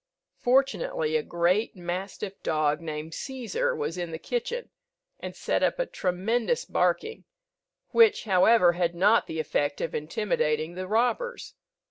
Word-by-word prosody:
Fortunately 455 - +1
a 470 - +3
great 180 - 0
mastiff 190 +3 -5
dog, 155 0 0
named 155 0 -5
Cæsar, 355 - -2
was 180 - -3
in 175 -1 -3
the 160 - -5
kitchen, 485 - -4 0.5
and - - -7
set - - -1
up - - +2
a - - 0
tremendous 225 - -1
barking, 450 +1 0 0.6
which, 450 -2 +5
however, 190 -1 +5
had 175 0 -1
not 205 +6 +4
the 160 - -4
effect 145 -2 -1
of - - -3
intimidating 155 -2 -1
the 185 +1 -5
robbers. 250 - -1
195 Hz, 135 wpm, -27 LUFS, -, 0.6 s, which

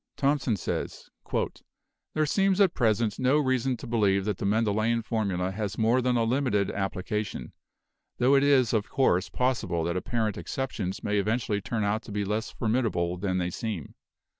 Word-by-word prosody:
Thomson 140 -5 +1
says: - - -4 1.0
"There 155 0 +2
seems 195 +5 +2
at 195 -4 +5
present 110 -2 +1
no 130 +3 +3
reason 130 -3 +1
to - - -9
believe 100 -5 +2
that 105 -3 -2
the 100 - -1
Mendelian 110 +2 +1
formula 100 -5 -1
has 105 0 -4
more 115 +3 +3
than 125 -1 +1
a 115 - +2
limited 115 -5 +1
application, 95 - -3 0.6
tho 125 +3 +4
it 140 - +5
is 135 -5 +4
of 110 -2 0
course 100 -10 +2
possible 115 -10 0
that 85 +2 -1
apparent 110 +2 -1
exceptions 110 -8 -4
may 105 0 +1
eventually 105 0 0
turn 110 +1 -2
out 105 +2 0
to 110 - -11
be 100 0 -1
less 105 +2 -2
formidable 110 -7 0
than 95 0 -1
they 90 -1 -1
seem. 105 -6 -5
110 Hz, 165 wpm, -27 LUFS, 100-125 Hz, 1.0 s, at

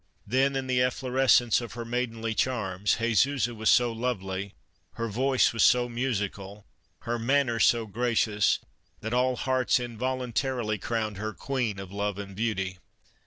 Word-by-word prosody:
Then 135 +5 +2
in 135 -1 -1
the 125 -1 +1
efflorescence 125 -2 +3
of 120 - -7
her 120 -1 -6
maidenly 115 -2 -2
charms, 105 -6 0
Jesusa 120 +2 +1
was 110 -1 0
so 120 -1 +4
lovely, 100 -5 -3 0.4
her 115 - -3
voice 130 +5 +2
was 115 - +2
so 125 0 +5
musical, 105 -5 -3 0.4
her 120 0 -2
manner 125 -1 +1
so 115 0 +4
gracious, 110 -1 +1 0.4
that 110 +2 -4
all 125 +1 +2
hearts 130 0 +1
involuntarily 125 -1 -2
crowned 110 -1 -2
her 110 +2 -4
queen 125 -7 -2
of 95 -1 -8
love 100 0 -2
and 100 -1 -7
beauty. 95 -4 -2
115 Hz, 145 wpm, -27 LUFS, 105-125 Hz, 0.4 s, so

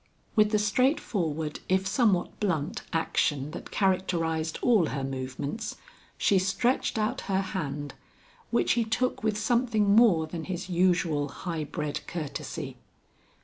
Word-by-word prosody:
With 215 -2 +5
the 210 - +2
straightforward 205 - 0
if 190 +1 +2
somewhat 200 -2 +1
blunt 165 -8 -1
action 150 -3 0
that - - -8
characterized 165 -4 0
all 215 -9 +4
her 140 - -3
movements, 135 - -4 0.4
she 195 - +3
stretched 225 +7 +1
out 215 0 0
her 190 0 +2
hand, 145 -7 -4 0.6
which 235 - +2
he 235 - +3
took 245 +3 -1
with 215 -1 +1
something 220 -2 +2
more 205 -9 +5
than 160 +1 -6
his 185 0 -4
usual 170 -5 +2
high 165 -2 -4
bred 150 0 -3
courtesy. 160 -5 -5
185 Hz, 130 wpm, -28 LUFS, 155-215 Hz, 0.6 s, With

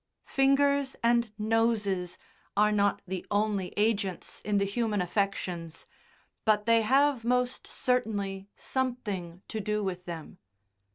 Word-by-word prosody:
Fingers 275 0 +3
and 235 -1 +3
noses 210 -5 +1 0.4
are 210 +1 +5
not 205 -1 +2
the 185 -1 -4
only 205 -3 0
agents 205 -3 0
in 205 0 +1
the 200 - +2
human 210 0 0
affections, 180 -3 -2 0.6
but 210 -1 +3
they 230 0 +5
have 270 +2 +3
most 250 +1 0
certainly 205 -6 -1
something 205 -9 -3
to 220 - -4
do 210 0 -1
with 180 -2 -3
them. 165 -3 -7
210 Hz, 120 wpm, -29 LUFS, 195-235 Hz, 0.6 s, are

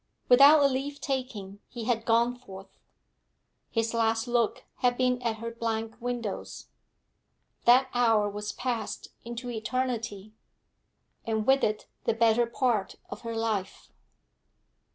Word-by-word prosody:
Without 285 +4 +8
a - - +6
leave 275 +2 -3
taking 225 -8 -4
he 240 -3 -7
had 230 -1 0
gone 235 +2 +3
forth; 195 -6 -13 0.9
his 225 0 -1
last 225 0 +1
look 240 -2 0
had 245 -1 +1
been 250 -1 +1
at 230 -2 -1
her 230 +1 -6
blank 225 -1 -3
windows. 240 -4 -5 1.0
That 255 +2 +6
hour 225 -4 +3
was 210 +1 -4
passed 245 -2 -4
into 240 +1 -6
eternity, 225 -3 -3 0.9
and 220 -1 -1
with 270 +2 +4
it 215 0 0 0.2
the - - +1
better 230 +1 +3
part 235 -5 0 0.2
of - - -7
her 230 -1 -5
life. 220 -4 -3
230 Hz, 130 wpm, -28 LUFS, 220-245 Hz, 1.0 s, Without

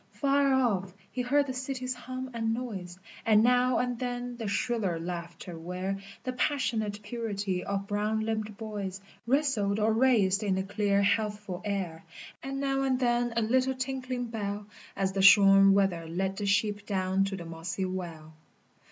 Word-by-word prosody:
Far 280 -1 +2
off 200 -8 +1 0.2
he 250 - -2
heard 280 +4 +2
the 260 - -4
city's 255 0 -3
hum 255 +1 -6
and 225 -1 0
noise, 195 -8 -6 0.3
And 215 -1 +5
now 250 +1 +4
and 245 -1 -1
then 245 -1 -3
the 230 -3 -5
shriller 200 -4 0
laughter 170 0 -6
where 185 +3 -3 0.2
The 255 - -3
passionate 225 -7 -1
purity 205 -4 -3
of 200 0 -2
brown 210 +2 0
limbed 215 -1 -3
boys 205 -3 -5 0.3
Wrestled 245 -7 +2
or 215 +1 +2
raced 220 -5 +3
in 200 -3 +1
the 190 - 0
clear 200 0 +1
healthful 205 -2 -1
air, 190 -6 -3 0.4
And 270 0 -4
now 270 -1 0
and 265 -2 +1
then 240 -1 +1
a 230 - +2
little 260 +4 +2
tinkling 255 -1 -3
bell 210 -3 -4 0.3
As 195 -1 0
the 195 0 -1
shorn 195 0 +8
wether 185 -5 +1
led 190 +3 -2
the 205 - -2
sheep 205 0 +1
down 190 -1 +1
to 195 0 -3
the 170 - -7
mossy 165 +3 -4
well. 170 -4 -6
210 Hz, 165 wpm, -29 LUFS, 195-245 Hz, 0.4 s, shorn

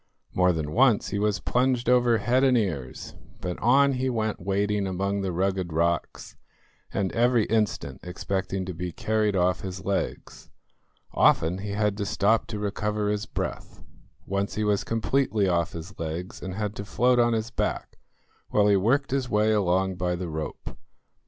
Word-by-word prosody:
More 90 0 +4
than 80 -3 -3
once 120 0 +3
he 100 - -2
was 105 0 +1
plunged 125 -1 0
over 120 -2 +4
head 125 +4 +2
and 130 -2 +4
ears, 80 - -3 0.3
but 90 -1 -4
on 135 +4 +4
he 130 0 -1
went 110 -3 -1
wading 100 +2 0
among 100 +2 -1
the 95 -1 -2
rugged 95 0 -1
rocks, 85 +1 -1 0.6
and 95 -2 -1
every 120 -2 +3
instant 110 -2 -1
expecting 95 +1 -3
to 90 - -5
be 90 +1 -4
carried 105 +3 0
off 90 -2 +1
his 95 0 -6
legs. 100 0 -3 0.6
Often 85 +4 +3
he 100 +1 -4
had 105 -1 +1
to 100 - -2
stop 110 +4 +2
to 110 - -5
recover 105 0 -1
his 105 0 -2
breath. - - -5 0.4
Once 100 +1 -2
he 110 - -1
was 105 -1 +1
completely 115 -2 +1
off 85 -2 0
his 85 +4 -9
legs 85 +3 -5
and 95 -1 -5
had 105 -1 -3
to 100 - -4
float 125 +4 +2
on 120 0 +3
his 110 +1 -2
back, - - -3 0.5
while 105 - +3
he 100 - +5
worked 125 +9 +2
his 135 -2 -1
way 105 0 +2
along 95 -2 +1
by 90 0 -1
the 90 -1 -5
rope. 80 -1 -6
100 Hz, 170 wpm, -26 LUFS, 90-110 Hz, 0.6 s, he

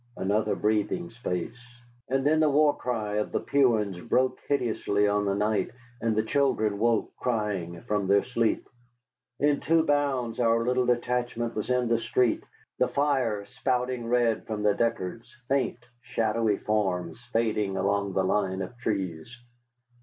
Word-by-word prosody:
Another 105 +3 0
breathing 110 - 0
space, 115 0 -4 0.5
and 135 +1 0
then 155 +2 +4
the 155 -1 +4
war 145 +1 +4
cry 110 -4 -2
of 105 - -1
the - - 0
Puans 110 -9 +1
broke 130 +2 +1
hideously 110 -6 +1
on 105 0 +1
the 100 0 +1
night, 105 +1 0 0.3
and 110 -1 0
children 110 -8 +1
woke, 115 0 +1
crying, 105 -8 -2
from 105 -2 -1
their 100 +1 +4
sleep. 115 -3 0 0.7
In 145 0 +3
two 165 +1 +3
bounds 140 -6 0
our 115 -1 +3
little 125 0 +1
detachment 120 -1 0
was 105 - -4
in 125 -1 +2
the 115 0 +2
street, 120 0 +1 0.4
the 125 - +4
fire 125 -6 0
spouting 125 -1 -2
red 120 -2 +1
from 105 -1 -3
the 105 -1 +4
Deckards, 115 +1 -2
faint, 135 -4 +1 0.2
shadowy 110 -2 0
forms 90 -6 -1
fading 105 -4 0
along 100 0 0
the 95 - +1
line 95 0 0
of 95 +6 -8
trees. 100 -2 -3
115 Hz, 145 wpm, -27 LUFS, 105-125 Hz, 0.7 s, then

